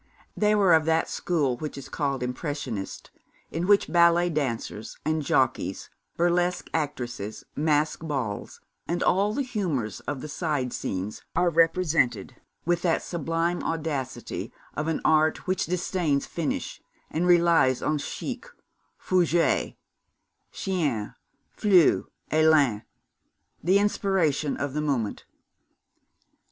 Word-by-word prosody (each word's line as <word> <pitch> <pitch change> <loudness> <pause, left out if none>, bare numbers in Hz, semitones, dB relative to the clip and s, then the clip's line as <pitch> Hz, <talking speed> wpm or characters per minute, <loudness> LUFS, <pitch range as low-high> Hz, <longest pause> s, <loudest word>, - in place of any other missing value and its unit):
They 210 0 +3
were 195 -4 +5
of 160 -1 +4
that 160 0 +2
school 145 -8 0
which 150 0 -6
is 140 - -8
called 140 -4 -2
Impressionist, 125 -5 -4 0.4
in 170 +3 -2
which 205 0 +5
ballet 170 0 +4
dancers 115 -7 -3
and 155 0 +1
jockeys, 145 - 0 0.3
burlesque 175 +1 +1
actresses, 125 -9 -3
masked 155 +1 +1
balls, 125 -9 -4 0.3
and 175 +1 -1
all 200 +3 +3
the 280 +6 -1
humours 170 - -2
of 145 -3 -3
the - - -6
side 145 -5 -2
scenes 95 +3 -4
are 175 0 +3
represented 165 - +2 0.3
with 175 0 +1
the 170 -2 +2
sublime 170 +1 -2
audacity 145 -7 -3 0.2
of 150 - -2
an 160 - -1
art 155 0 +3
which 185 0 0
disdains 175 -4 0
finish, 165 -4 -3 0.3
and 170 +3 0
relies 170 -7 +4
on 150 0 +1
chic, 245 - -5 0.5
fougue, 175 -2 +1 0.8
chien, 145 - -2 0.4
flou, 190 -6 +4 0.2
élan, 155 -8 +4 0.8
the 185 +5 +4
inspiration 190 -8 +1
of 145 -2 -3
the 150 - -1
moment. 135 -8 -2
160 Hz, 120 wpm, -26 LUFS, 140-175 Hz, 0.8 s, were